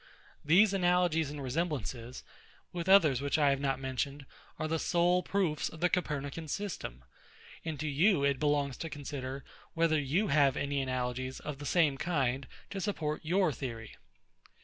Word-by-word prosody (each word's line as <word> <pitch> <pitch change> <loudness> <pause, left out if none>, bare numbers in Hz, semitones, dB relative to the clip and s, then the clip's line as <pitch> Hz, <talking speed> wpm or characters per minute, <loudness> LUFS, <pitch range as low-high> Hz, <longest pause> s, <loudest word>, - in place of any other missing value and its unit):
These 190 +7 +5
analogies 175 -4 +2
and 145 -1 -6
resemblances, 130 -4 -3 0.5
with 175 +1 -3
others 155 -10 +6
which 140 +1 0
I 145 -2 +4
have 140 - 0
not 135 -1 0
mentioned, 135 +2 -3 0.3
are 155 - -2
the 160 +1 -1
sole 175 +2 +2
proofs 180 -6 0
of 160 - -12
the 180 +2 +3
COPERNICAN 150 -2 -2
system; 155 - -5 0.6
and 160 -3 -4
to 155 - -2
you 155 +3 +3
it 140 -2 +2
belongs 145 -3 +1
to 165 - -5
consider, 140 -2 -6 0.3
whether 165 -2 +3
you 155 +10 0
have 140 -2 +4
any 140 -1 -1
analogies 130 0 -3
of 150 -2 -6
the 145 - -5
same 150 -6 +2
kind 135 -6 0 0.2
to 195 - -4
support 155 -6 -2
your 180 +1 +2
theory. 115 -4 -6
150 Hz, 160 wpm, -31 LUFS, 135-170 Hz, 0.6 s, others